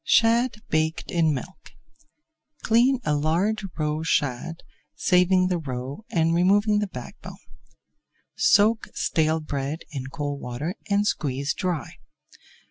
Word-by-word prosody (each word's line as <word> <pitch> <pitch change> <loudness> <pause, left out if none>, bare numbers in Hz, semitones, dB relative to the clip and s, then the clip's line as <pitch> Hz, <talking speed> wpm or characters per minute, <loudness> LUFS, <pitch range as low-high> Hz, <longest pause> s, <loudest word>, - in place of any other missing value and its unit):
SHAD 230 0 +3
BAKED 160 +1 0
IN 165 -3 +2
MILK 150 +7 -7 0.9
Clean 240 +3 +3
a 150 - +1
large 175 +9 0
roe 155 0 -1
shad, 160 +1 -1 0.3
saving 185 0 +3
the 180 -2 0
roe 135 - -6
and 165 -1 +2
removing 205 +4 +3
the 210 - -1
back 190 - -9
bone. - - -9 1.0
Soak 215 +2 +4
stale 160 -1 +1
bread 145 +1 -4
in 135 -3 -5
cold 145 -1 -4
water 130 +8 -4 0.2
and 205 0 +2
squeeze 140 -6 -1
dry. 180 - -3
165 Hz, 125 wpm, -25 LUFS, 145-205 Hz, 1.0 s, Soak